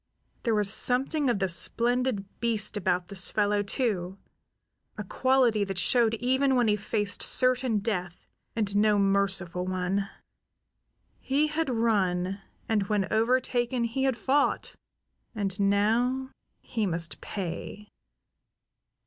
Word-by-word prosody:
There 230 Hz, -3 st, 0 dB
was 210 Hz, -1 st, +2 dB
something 265 Hz, +5 st, +2 dB
of 240 Hz, -, +1 dB
the 195 Hz, -1 st, 0 dB
splendid 235 Hz, +4 st, +1 dB
beast 220 Hz, -3 st, +1 dB
about 180 Hz, -3 st, -1 dB
this 190 Hz, -2 st, +1 dB
fellow, 205 Hz, -1 st, +1 dB
too; 200 Hz, -4 st, -2 dB, 0.8 s
a 210 Hz, -, -4 dB
quality 245 Hz, 0 st, +2 dB
that 195 Hz, -2 st, -5 dB
showed 230 Hz, +4 st, +2 dB
even 260 Hz, +3 st, +1 dB
when 245 Hz, -2 st, +2 dB
he 210 Hz, -, +3 dB
faced 205 Hz, -1 st, -2 dB
certain 255 Hz, -3 st, +2 dB
death 185 Hz, -4 st, -4 dB, 0.3 s
and 205 Hz, -3 st, -1 dB
no 210 Hz, 0 st, +3 dB
merciful 195 Hz, -3 st, +1 dB
one. 185 Hz, +2 st, -2 dB, 1.1 s
He 280 Hz, +3 st, +1 dB
had 315 Hz, 0 st, -2 dB
run, 195 Hz, -5 st, 0 dB, 0.3 s
and 210 Hz, -3 st, 0 dB
when 205 Hz, -2 st, -1 dB
overtaken 240 Hz, +1 st, +1 dB
he 245 Hz, +4 st, -1 dB
had 260 Hz, -3 st, 0 dB
fought; 275 Hz, +5 st, 0 dB, 0.6 s
and 200 Hz, -1 st, -2 dB
now 230 Hz, +7 st, +1 dB, 0.3 s
he 220 Hz, -4 st, -2 dB
must 165 Hz, -4 st, -3 dB
pay. 200 Hz, +2 st, -6 dB
210 Hz, 125 wpm, -27 LUFS, 195-245 Hz, 1.1 s, he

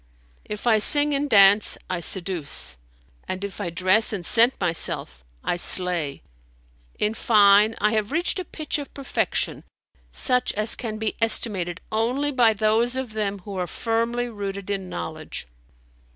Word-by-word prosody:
If 210 Hz, +2 st, -8 dB
I 225 Hz, -3 st, +3 dB
sing 290 Hz, +6 st, +5 dB
and 285 Hz, +1 st, -2 dB
dance, 200 Hz, -1 st, +5 dB
I 185 Hz, -1 st, -3 dB
seduce, 175 Hz, -, 0 dB, 0.5 s
and 185 Hz, +1 st, -5 dB
if 200 Hz, 0 st, -7 dB
I 180 Hz, -, -3 dB
dress 185 Hz, +6 st, +2 dB
and 190 Hz, -5 st, -5 dB
scent 235 Hz, +5 st, +3 dB
myself, 165 Hz, -, -1 dB, 0.2 s
I 175 Hz, -, -2 dB
slay. 175 Hz, -5 st, +4 dB, 0.7 s
In 210 Hz, +1 st, -1 dB
fine, 210 Hz, -1 st, +4 dB
I 210 Hz, +1 st, +1 dB
have 215 Hz, 0 st, -2 dB
reached 340 Hz, +4 st, -1 dB
a -, -, -4 dB
pitch 310 Hz, -2 st, -5 dB
of 285 Hz, -, -9 dB
perfection 275 Hz, -1 st, -3 dB, 0.5 s
such 250 Hz, -2 st, +1 dB
as 215 Hz, +1 st, +1 dB
can 220 Hz, -3 st, -6 dB
be 220 Hz, -1 st, -3 dB
estimated 190 Hz, -6 st, 0 dB
only 250 Hz, +7 st, -1 dB
by 245 Hz, -4 st, +3 dB
those 220 Hz, +4 st, +1 dB
of 260 Hz, -4 st, -5 dB
them 200 Hz, -2 st, -3 dB
who 200 Hz, -, -8 dB
are 180 Hz, -1 st, -3 dB
firmly 230 Hz, +5 st, -2 dB
rooted 200 Hz, -3 st, -6 dB
in 190 Hz, -2 st, -4 dB
knowledge." 85 Hz, -5 st, -7 dB
215 Hz, 150 wpm, -23 LUFS, 190-235 Hz, 0.7 s, sing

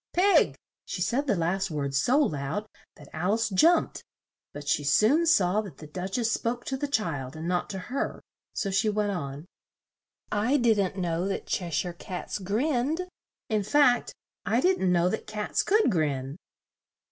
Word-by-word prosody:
Pig!" 385 Hz, +3 st, +4 dB, 0.3 s
She -, -, -6 dB
said 275 Hz, +4 st, 0 dB
the 210 Hz, -, +2 dB
last 190 Hz, +3 st, 0 dB
word 140 Hz, -3 st, -3 dB
so 240 Hz, -, +3 dB
loud 160 Hz, -, 0 dB, 0.3 s
that 145 Hz, -, -14 dB
Al 180 Hz, +6 st, +1 dB
ice 225 Hz, -1 st, 0 dB
jumped; 320 Hz, -, +3 dB, 0.5 s
but 145 Hz, 0 st, -9 dB
she 145 Hz, -, +1 dB
soon 225 Hz, -, +3 dB
saw 200 Hz, -, +3 dB
that 200 Hz, -5 st, -10 dB
the 155 Hz, -, -10 dB
Duch 185 Hz, +7 st, -4 dB
ess 230 Hz, -2 st, +1 dB
spoke 240 Hz, +2 st, -2 dB
to 270 Hz, -, -2 dB
the 290 Hz, +2 st, -2 dB
child 160 Hz, -, -2 dB
and 160 Hz, +1 st, -5 dB
not 180 Hz, 0 st, -1 dB
to 195 Hz, -, -4 dB
her, 245 Hz, +9 st, -3 dB, 0.3 s
so 195 Hz, -, -2 dB
she 195 Hz, +3 st, +2 dB
went 210 Hz, -1 st, 0 dB
on: 145 Hz, -4 st, -5 dB, 0.9 s
"I 225 Hz, +7 st, +2 dB
didn't 215 Hz, -7 st, +2 dB
know 175 Hz, 0 st, -1 dB
that 195 Hz, -, -3 dB
Che 175 Hz, -2 st, -2 dB
shire 170 Hz, +2 st, -1 dB
cats 180 Hz, +3 st, -6 dB
grinned; 265 Hz, -, 0 dB, 0.4 s
in 215 Hz, -3 st, +1 dB
fact, 250 Hz, +2 st, +3 dB, 0.3 s
I 220 Hz, +4 st, +1 dB
didn't 265 Hz, -, +2 dB
know 175 Hz, 0 st, +3 dB
that 220 Hz, -, -3 dB
cats 210 Hz, -1 st, -1 dB
could 420 Hz, -, +3 dB
grin." 145 Hz, -4 st, -1 dB
200 Hz, 170 wpm, -27 LUFS, 170-245 Hz, 0.9 s, Pig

